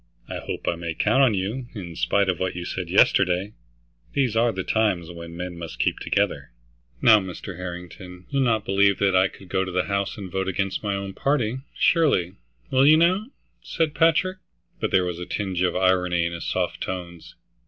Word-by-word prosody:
"I - - -5
hope - - -6
I - - +3
may 85 -1 -5
count 135 - +3
on 125 -6 +4
you, 110 +7 -3
in 85 -5 -7
spite 100 +3 +1
of 95 -3 0
what 95 -1 -2
you 90 0 -5
said 90 -1 -4
yesterday. 95 +1 +3 0.6
These 130 -6 +1
are 115 +1 +3
the 95 -3 -4
times 95 -7 0
when 85 0 -9
men 90 -1 -6
must 85 -2 -7
keep - - 0
together." - - -1 0.5
"Now 110 -2 +8
Mr. 95 -1 -7
Harrington, 90 0 -8
you'll 140 -1 +1
not 110 -5 +1
believe 100 0 +3
that 100 -2 +2
I 95 +1 +5
could 95 +1 -14
go 95 +1 0
to 95 - -5
the 90 0 +1
House 100 +2 -2
and 95 -3 -7
vote 95 +1 -2
against 95 +1 -1
my 100 -2 -1
own 100 0 -5
party, 130 -2 0 0.2
surely, 135 - +3 0.4
will 130 +2 +5
you 155 +1 +8
now?" 185 +6 +2 0.3
said 160 -2 -1
Patrick. 165 +4 +2 0.4
But - - -1
there 90 -1 +3
was 90 -1 -4
a 90 - -6
tinge 95 -4 -2
of 90 - +1
irony 90 -2 +2
in 85 - -2
his 85 - -5
soft - - -2
tones. 85 -3 -6
95 Hz, 200 wpm, -24 LUFS, 90-110 Hz, 0.6 s, Now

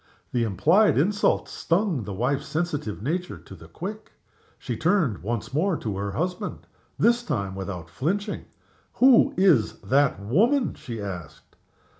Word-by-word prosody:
The 120 - +1
implied 160 - +3
insult 200 +8 +2
stung 170 - 0
the 100 - -5
wife's 125 +6 -1
sensitive 150 - -3
nature 175 +7 -2
to - - -14
the 80 -3 -13
quick. 200 - -7 0.4
She - - -4
turned 165 - +1
once 115 +5 -4
more 165 +4 +1
to 105 -4 -4
her 100 0 -3
husband 180 - -3 0.3
this 240 +1 +3
time 100 - -3
without 95 -3 -6
flinching. 200 - -2 0.5
"Who 255 -1 +5
is 175 - +4
that 140 -4 +2
woman?" 220 - +2
she 115 -2 -7
asked. 90 -6 -8
145 Hz, 140 wpm, -25 LUFS, -, 0.5 s, Who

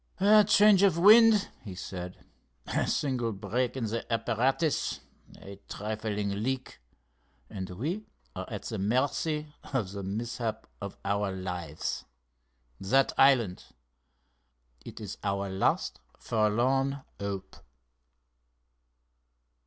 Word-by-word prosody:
"A 210 +2 +7
change 205 -1 +6
of 195 -5 +4
wind," 215 +2 +7
he 95 -4 -8
said, 90 0 -7 0.4
"a - - -1
single 125 -5 0
break 110 +6 -2
in 130 - -2
the 115 +2 -4
apparatus, 125 +7 0 0.4
a 100 0 -11
trifling 105 -1 -3
leak, 130 - -3 0.7
and 95 -3 -5
we 155 - -4 0.3
are - - -5
at - - -5
the - - -4
mercy 145 +8 0 0.2
of 110 -9 -1
the 100 0 -5
mishap 110 +3 -3 0.2
of 100 -1 -6
our 100 0 0
lives! 90 -4 -4 0.7
That 135 +8 +2
island—it 60 - -2
is 105 -3 -7
our 100 -1 -1
last 95 - 0 0.2
forlorn 130 +6 +1 0.2
hope!" 100 -2 -5
110 Hz, 105 wpm, -29 LUFS, 95-135 Hz, 0.7 s, A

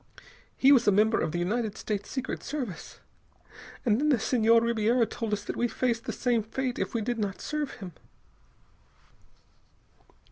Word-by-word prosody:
He 270 - +6
was 250 -5 +5
a - - +7
member 215 +3 +3
of 155 - -1
the 175 - -3
United 215 +5 -1
States 205 -2 -4
Secret 260 -2 -4
Service.... 255 - -6 0.8
And 220 -1 +3
then 300 - +2
the 275 - +4
Senhor 230 +1 +4
Ribiera 230 +1 +2
told 225 -1 -5
us 205 -1 -1
that - - -5
we 240 - +1
faced 235 -1 -1
the - - -2
same 240 -3 +1
fate 250 +4 -3
if - - -3
we 230 - +1
did 235 +2 -2
not 200 -2 -2
serve 300 -2 -3
him...." 190 -7 -9
230 Hz, 170 wpm, -28 LUFS, 210-250 Hz, 0.8 s, a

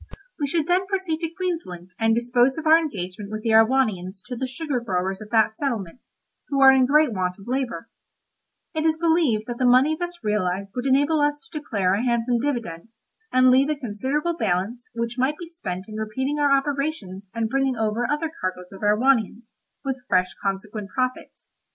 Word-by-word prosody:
We 290 - 0
should 315 +2 0
then 365 +2 +1
proceed 375 -5 -1
to 330 -1 -2
Queensland, 325 - -5
and 225 0 +3
dispose 245 +3 +2
of 320 - -5
our 320 +1 +7
engagement 200 - -5
with 215 0 -5
the 225 - +1
Erewhonians 220 -5 +2
to 250 - -5
the 260 +2 -3
sugar 275 0 -3
growers 190 -3 -2
of 210 - -9
that 220 -1 +3
settlement, 235 - -3 0.5
who 275 - -1
are 270 -1 +9
in 260 -1 +4
great 300 -2 +4
want 180 -2 -2
of 195 - -14
labour; 255 -1 -2 0.9
it 315 -1 -1
is 315 -1 +2
believed 320 -10 +2
that 240 0 -6
the - - 0
money 260 +5 +5
thus 350 +1 -6
realised 200 -2 -1
would 250 +2 -2
enable 285 +4 +3
us 290 -1 0
to 305 - -6
declare 200 -10 0
a 205 +4 0
handsome 240 0 +1
dividend, 230 -7 -3 0.4
and 255 0 +5
leave 270 +3 +4
a 305 - +1
considerable 280 +7 -2
balance, 205 - -1
which 235 +1 -3
might 275 +4 +1
be 345 - -8
spent 195 - -6
in 215 - -10
repeating 260 +7 -2
our 290 -1 +3
operations 275 - -1
and 230 -1 0
bringing 270 +2 0
over 220 +2 0
other 305 +2 -1
cargoes 180 -1 -4
of 195 - -11
Erewhonians, 225 +1 +2 0.3
with 265 -2 -3
fresh 185 0 +2
consequent 200 +1 -4
profits. 255 +1 -3
245 Hz, 190 wpm, -24 LUFS, 210-290 Hz, 0.9 s, are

